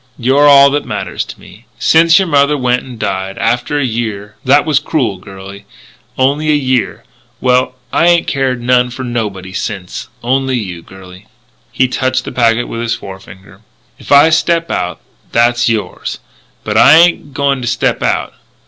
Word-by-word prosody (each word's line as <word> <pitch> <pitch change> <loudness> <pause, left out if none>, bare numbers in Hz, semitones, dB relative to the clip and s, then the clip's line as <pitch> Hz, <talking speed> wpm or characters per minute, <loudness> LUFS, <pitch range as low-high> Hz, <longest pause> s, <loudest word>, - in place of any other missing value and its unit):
You're 135 +4 +3
all 140 -1 +7
that 145 +1 -1
matters - - -4
to - - -11
me... - - -17
since 165 +1 +4
your 190 -2 +1
mother 145 -1 +2
went 125 -1 0
and 125 -3 -11
died... 95 -2 -3
after 120 +5 -1
a 145 - 0
year.... 110 -3 -4
That 140 +2 +3
was 150 -3 +2
crool, 125 - -2
girlie. 100 +1 -11 0.5
Only 145 +4 +1
a 150 - +4
year. 130 -3 -1 0.4
Well, 125 0 +1 0.2
I 170 - +3
ain't 170 -1 +3
cared 130 -3 -2
none 125 0 +2
for 125 +2 -7
nobody 105 -7 -4
since 95 -1 -5 0.2
only 130 +1 0
you, 90 -7 -6
girlie." 95 +2 -15 0.4
He 130 - +1
touched 130 0 -1
the - - -6
packet 120 -1 +1
with 115 - -5
his 115 0 -1
forefinger: 95 0 -12 0.4
"If - - -12
I 145 +3 +6
step 170 +1 +1
out, 90 0 -3 0.3
that's 120 +1 +2
yours. 110 -2 -3 0.5
But - - -2
I 145 - +7
ain't 170 +1 +4
a - - -21
going 140 -2 -1
to 120 - -4
step 125 - -1
out. - - -1
125 Hz, 175 wpm, -14 LUFS, 105-140 Hz, 0.5 s, all